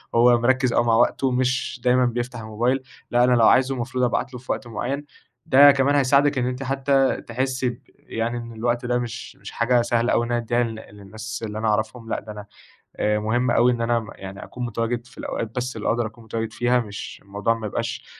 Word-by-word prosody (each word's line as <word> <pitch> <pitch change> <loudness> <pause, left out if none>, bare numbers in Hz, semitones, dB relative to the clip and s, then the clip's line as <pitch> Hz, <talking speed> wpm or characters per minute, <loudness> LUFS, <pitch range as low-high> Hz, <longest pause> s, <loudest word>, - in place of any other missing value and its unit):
هو 120 +1 +6
مركز 130 0 +2
أوي 120 - +3
مع 115 -1 +3
وقته، 125 +3 +2
مش 130 0 -1
دايمًا 125 0 +4
بيفتح 120 0 -3
الموبايل 120 +5 -1 0.3
لأ، 120 0 +4
أنا 125 - +4
لو 115 -2 +5
عايزُه 135 +1 +4
المفروض 125 +1 -2
أبعت 125 +1 0
له 125 - -6
في 125 - -5
وقت 120 - -3
معين، 135 +6 -3 0.4
ده 140 +2 +8
كمان 140 +1 +2
هيساعدِك 140 +1 +3
إن 125 - +1
أنتِ 125 +1 -3
حتى 135 0 +1
تحِسِّي 130 +1 -1
ب 120 - -9 0.2
يعني 115 +1 -2
إن 115 -1 -7
الوقت 120 +2 -1
ده 125 0 +1
مش 120 -2 -6
مش - - -10
حاجة 120 +1 +2
سهلة 120 0 +1
أوي 120 - +2
إن 120 - -5
أنا 120 - +1
أدّيها 120 +1 +1
لل 115 -1 -4
للنّاس 110 +3 -8
اللي 105 0 -6
أنا 110 +1 -1
أعرفهم 110 +2 -1
لأ، - - -1
ده 105 +1 -10
أنا 105 -1 -8 0.5
آآ 105 0 +1
مُهم 120 +4 0
أوي 120 +1 +4
إن 120 -1 -2
أنا 115 -1 0
يعني 95 0 -9
أكون 125 -1 -6
متواجد 120 +1 -2
في - - -20
الأوقات 115 - -4
بس 125 +1 -3
اللي - - -4
أقدر 120 0 +1
أكون 115 +1 -14
متواجد 110 0 -4
فيها، 120 +2 +2
مش 105 -4 -7
الموضوع 100 +3 0
ما 115 -2 -5
يبقاش - - -4
120 Hz, 220 wpm, -23 LUFS, 115-125 Hz, 0.5 s, ده